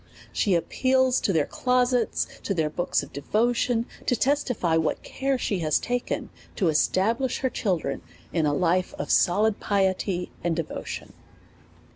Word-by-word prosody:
She 195 -4 +2
appeals 260 +8 +2
to - - +1
their 160 -5 +2
clo 250 0 +2
sets, 245 -2 0 0.2
to 195 - -2
their 155 -3 0
books 175 -3 0
of 140 - -12
devotion, 235 - +1 0.2
to 245 - +3
testify 250 - +1
what 160 -1 0
care 270 0 -1
she 200 -6 -1
has 155 -3 +2
taken 245 0 -3 0.2
to 185 -6 +2
establish 225 - +1
her 260 - 0
children 185 -7 -1 0.3
in 160 -3 +2
a - - +2
life 180 +2 +1
of - - -3
solid 205 +4 +3
piety 190 -2 0
and 170 -1 +1
devotion. 165 -1 -5
200 Hz, 150 wpm, -26 LUFS, 170-245 Hz, 0.3 s, to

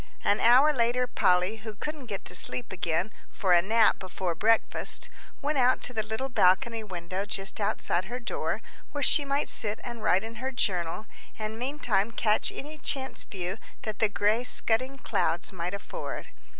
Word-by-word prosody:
An 205 - +3
hour 260 +6 +6
later, 245 0 +2
Polly, 180 -2 +2
who 215 0 -8
couldn't 295 +4 -6
get 200 -3 -5
to - - -6
sleep 125 -8 0
again, 175 +2 -1 0.2
for 190 -5 +1
a 175 - +6
nap 220 +4 +4
before 185 -1 -3
breakfast, 220 +7 +1 0.3
went 290 -1 +1
out 255 0 +3
to 250 - -3
the 220 - 0
little 220 +5 -3
balcony 225 0 +3
window 185 -1 -4
just 195 +1 -3
outside 185 -2 0
her 245 +5 -5
door, 240 - -3 0.3
where 290 -1 -2
she 290 - +6
might 280 +1 0
sit 210 0 0
and 235 -2 -6
write 195 -2 +3
in 225 0 -7
her 260 +3 -3
journal, 185 -5 -1 0.3
and 215 +1 -4
meantime 245 -6 0
catch 215 -1 +2
any 305 +2 -8
chance 265 -3 -1
view 190 +2 -5 0.2
that 215 -1 -4
the 220 - +4
grey 210 +3 +2
scudding 255 +2 0
clouds 200 -7 -1
might 180 +2 -3
afford. 200 - -6
220 Hz, 175 wpm, -28 LUFS, 190-250 Hz, 0.3 s, hour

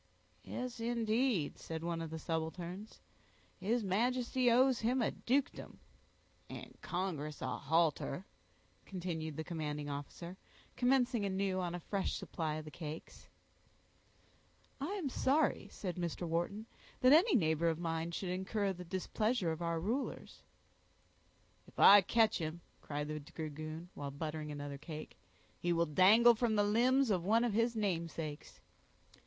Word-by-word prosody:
"Yes, 250 -1 -5
indeed," 230 - 0
said 160 0 -5
one 170 -1 -2
of 165 - -4
the 160 - -5
subalterns, 170 +5 -4 0.6
"his 220 +5 0
Majesty 245 +5 +1
owes 255 +1 +4
him 245 +4 +1
a 235 - +1
dukedom." 270 +3 -1 0.7
"And - - -9
congress 160 -5 -3
a 130 -1 -2
halter," 160 +2 +1 0.6
continued 165 -5 -4
the 160 - -2
commanding 150 -3 -4
officer 170 +5 -7 0.4
commencing 250 -3 +2
anew 190 -1 0
on 175 -1 -2
a - - -4
fresh 195 +2 -2
supply 155 -3 -3
of 155 0 -6
the 155 - -9
cakes. 155 0 -8 1.5
"I 295 +8 -3
am 380 -8 -2
sorry," 275 +3 +1
said 180 -4 -5
Mr. 175 0 -3
Wharton, 175 +6 -1 0.4
"that 255 +2 +7
any 355 +7 +6
neighbor 160 -5 +2
of 160 - -1
mine 165 -1 -2
should 180 +2 -4
incur 190 +2 -1
the 180 0 -8
displeasure 190 +2 0
of 160 +1 -5
our 170 -1 0
rulers." 230 +11 -3 1.3
"If - - -19
I 205 0 +9
catch 220 +3 +3
him," 160 +1 -4 0.2
cried 145 0 -4
the 155 0 -3
dragoon, 155 +2 -7
while 140 -1 -5
buttering 150 +1 -4
another 145 -1 -6
cake, 155 0 -8 0.4
"he 175 - 0
will 170 0 +3
dangle 200 +9 +7
from 230 -1 +1
the 205 - +4
limbs 245 +4 +3
of 180 -4 +1
one 225 +5 +3
of 240 -3 0
his 230 +2 +2
namesakes." 165 -7 -3
180 Hz, 145 wpm, -35 LUFS, 160-230 Hz, 1.5 s, I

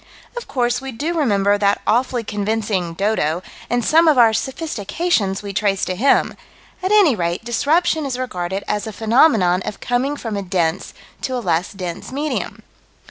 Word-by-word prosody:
Of 485 - -6
course 245 0 0
we 270 0 -6
do 295 +8 -3
remember 205 -9 +2
that 200 0 +2
awfully 245 0 +1
convincing 205 -4 -2
"dodo," 180 -4 0 0.3
and 245 -1 0
some 325 +2 +5
of 305 -4 +5
our 230 -2 +6
sophistications 220 - -1
we 200 -1 -6
trace 195 -1 0
to 185 - -3
him 270 +9 +2 0.5
at 375 +1 -1
any 400 - +5
rate 175 +3 -2
disruption 310 +7 +1
is 255 -2 -3
regarded 190 -6 -3
as 210 +1 -2
a 220 - -6
phenomenon 220 - +3
of - - -6
coming 260 +4 -1
from 225 -5 -5
a 200 - -2
dense 175 -2 -2 0.3
to 260 - -2
a - - -1
less 175 -6 -1
dense 180 -1 -6
medium. 295 +3 -3
220 Hz, 170 wpm, -20 LUFS, 195-265 Hz, 0.5 s, our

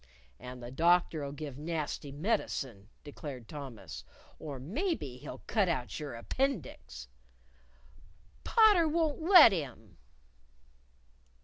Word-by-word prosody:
"And 125 0 -9
the 120 - -7
doctor'll 165 -1 +2
give 145 -2 -7
nasty 150 -2 -3
medicine," 135 - -2
declared 140 -5 -8
Thomas, 125 - -8 0.4
"or 145 -3 -6
maybe 175 - -3
he'll - - -9
cut 205 -5 +1
out 120 -10 -2
your 145 -5 -6
appendix!" 165 - -3 1.4
"Potter 420 -7 +5
won't 315 -1 0
let 340 - +9
him." 125 - -6
150 Hz, 100 wpm, -31 LUFS, -, 1.4 s, let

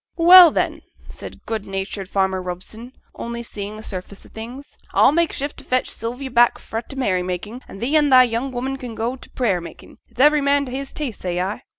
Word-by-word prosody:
'Well, 350 0 +9
then,' - - -2 0.3
said - - -11
good 220 -3 -4
natured 195 0 -5
farmer 190 -1 0
Robson, 190 +7 -8 0.2
only 235 0 -6
seeing 210 -2 -7
the 215 - -10
surface 195 -1 -7
of - - -17
things, 245 +6 -9 0.2
'a'll - - +6
make 335 +2 +1
shift 285 +1 -4
to - - -12
fetch 255 0 -1
Sylvie 245 +4 -5
back 240 -1 +3
fra' 225 - -5
t' 275 - -12
merry 200 -9 0
making, 185 +7 -5
and 195 - -11
thee 265 +8 -1
an' 295 -2 +4
thy 255 -1 +8
young 245 +2 -2
woman 260 +2 -3
can 245 -4 -8
go 235 +3 -2
to 265 - -14
t' - - -31
prayer 205 -9 0
makin'; 170 - -12
it's - - -19
every 295 +2 +5
man 280 0 +2
to 255 - -8
his 270 +1 -5
taste, 275 -8 -5
say 180 -1 -2
I.' 195 +6 -3
235 Hz, 225 wpm, -21 LUFS, 200-270 Hz, 0.3 s, Well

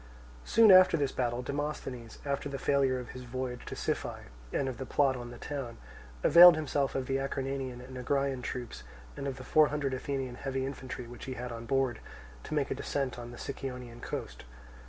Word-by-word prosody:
Soon 225 -2 +7
after 185 -2 +8
this 140 -3 0
battle 120 -1 -1
Demosthenes, 135 -4 -4
after 140 0 -2
the 140 - -4
failure 135 -1 +2
of 125 -1 -7
his 125 - -8
voyage 125 0 -5
to - - -5
Siphae - - -3 0.2
and 135 - 0
of 130 -3 -4
the 130 - -3
plot 135 -1 +3
on 120 -1 -6
the 120 - -9
town, 135 -5 -5 0.5
availed 175 0 +10
himself 145 -3 -1
of 135 -1 -1
the 135 +1 0
Acarnanian 135 -2 -3
and 130 +1 -10
Agraean 135 +1 0
troops 120 -1 -5 0.3
and 140 - -4
of 135 -1 -4
the 130 - -8
four 155 +4 +5
hundred 145 -2 -2
Athenian 130 -1 -3
heavy 135 -1 -2
infantry 130 -2 -6
which 120 +1 -9
he 130 - -5
had 125 0 -5
on 115 0 -7
board, 135 -3 +1 0.5
to - - -3
make 145 -2 0
a - - +3
descent 135 -3 -2
on 120 0 -7
the 120 - -10
Sicyonian 125 -3 -6
coast. - - -5
130 Hz, 200 wpm, -31 LUFS, 125-140 Hz, 0.5 s, availed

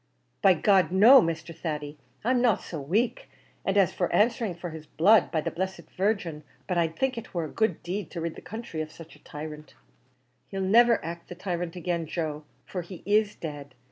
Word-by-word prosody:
"By 190 -2 +6
G 155 - -10
d! 190 -4 +4
no, 240 +7 +9
Mr. 165 -1 -3
Thady; 150 -3 -5 0.2
I'm 245 +2 +2
not 235 -5 +3
so 160 -4 -6
wake; 225 - -1 0.3
and 195 +1 0
as 190 -5 +4
for 175 - -1
answering 225 -3 +2
for 170 0 -6
his 155 -1 -9
blood, 205 +7 +4
by 160 - 0
the - - -3
blessed 190 +3 -5
Virgin, 185 -6 -1 0.2
but 180 - -1
I'd 165 -2 +1
think 260 -2 0
it 220 - -13
war 170 -2 0
a - - -5
good 220 +1 -1
deed 190 +4 -4
to 170 - -6
rid 165 0 -2
the - - -11
counthry 220 -8 -6
of 155 0 -6
such 165 0 -13
a - - -22
tyrant." 150 0 -8 0.7
"He'll 195 -1 -4
niver 230 +5 +5
act 170 +1 -7
the 175 - -7
tyrant 175 -1 -4
again, 170 -2 -2
Joe, 155 -2 -3 0.2
for 180 - -4
he 175 +1 -10
is 210 0 +2
dead. 145 -4 -7
175 Hz, 205 wpm, -27 LUFS, 160-205 Hz, 0.7 s, no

